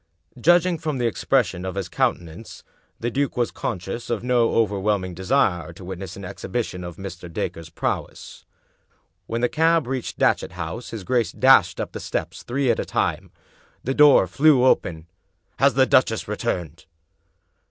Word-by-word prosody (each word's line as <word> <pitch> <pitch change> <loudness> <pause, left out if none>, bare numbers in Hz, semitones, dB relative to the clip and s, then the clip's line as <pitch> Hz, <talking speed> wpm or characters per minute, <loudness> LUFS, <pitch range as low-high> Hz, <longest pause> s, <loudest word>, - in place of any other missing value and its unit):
Judging 175 +3 +3
from 150 -3 -3
the 120 - -1
expression 115 -5 0
of 95 0 -4
his 100 -2 -3
countenance, 85 +4 -3 0.4
the 120 +1 -2
duke 140 +1 -1
was 120 -1 0
conscious 100 +2 -5
of 115 -2 -2
no 120 -2 +2
overwhelming 100 -3 0
desire 90 - 0
to 85 +2 -12
witness 95 +1 -7
an 100 - -8
exhibition 100 0 -4
of 85 -1 -7
Mr. 90 -3 -8
Dacre's 80 0 -4
prowess. 85 - -4 0.8
When 115 +1 -2
the 125 - +3
cab 165 +3 +2
reached 130 -1 -4
Datchet - - +1
House 90 +7 -6
his 110 -4 -7
g^ace 120 +3 0
dashed 125 -9 +5
up - - -3
the - - -6
steps - - -4
three 130 0 0
at - - -1
a - - 0
time. - - -1 0.5
The 135 - -1
door 145 -8 +6
flew 135 - +4
open. 80 -10 +1 0.3
" - - -38
Has - - +4
the - - +5
duchess - - +2
returned? 85 -2 -4
110 Hz, 165 wpm, -23 LUFS, 90-130 Hz, 0.8 s, door